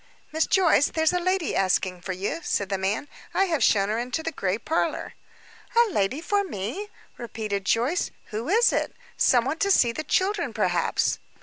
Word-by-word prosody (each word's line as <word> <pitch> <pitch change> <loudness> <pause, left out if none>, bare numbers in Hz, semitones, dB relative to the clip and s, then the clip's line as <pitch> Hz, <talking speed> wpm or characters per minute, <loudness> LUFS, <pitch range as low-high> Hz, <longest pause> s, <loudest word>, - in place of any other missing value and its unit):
"Miss 315 +1 +1
Joyce, 335 -7 +4
there's 320 +1 +1
a 360 - +1
lady 370 -1 0
asking 185 -1 +1
for 190 - -5
you," 195 - -3
said 200 -8 -1
the 195 -1 -1
man. 200 +9 -1 0.3
"I 390 - +4
have 320 -9 0
shown 200 -2 +3
her 220 +2 0
into 250 +6 -3
the 325 - -2
gray 195 - -1
parlor." 320 +8 -2 0.6
"A 470 -3 +5
lady 210 - 0
for 405 +4 +1
me?" 330 - -5 0.3
repeated 215 -4 -4
Joyce. 245 - +1 0.2
"Who 225 +7 -4
is 460 +5 +4
it? - - -1 0.2
Some 245 -2 +3
one 305 +5 -2
to 400 - +1
see 245 -11 +4
the 310 +6 -5
children, 390 +6 0
perhaps." - - +1
265 Hz, 185 wpm, -25 LUFS, -, 0.6 s, A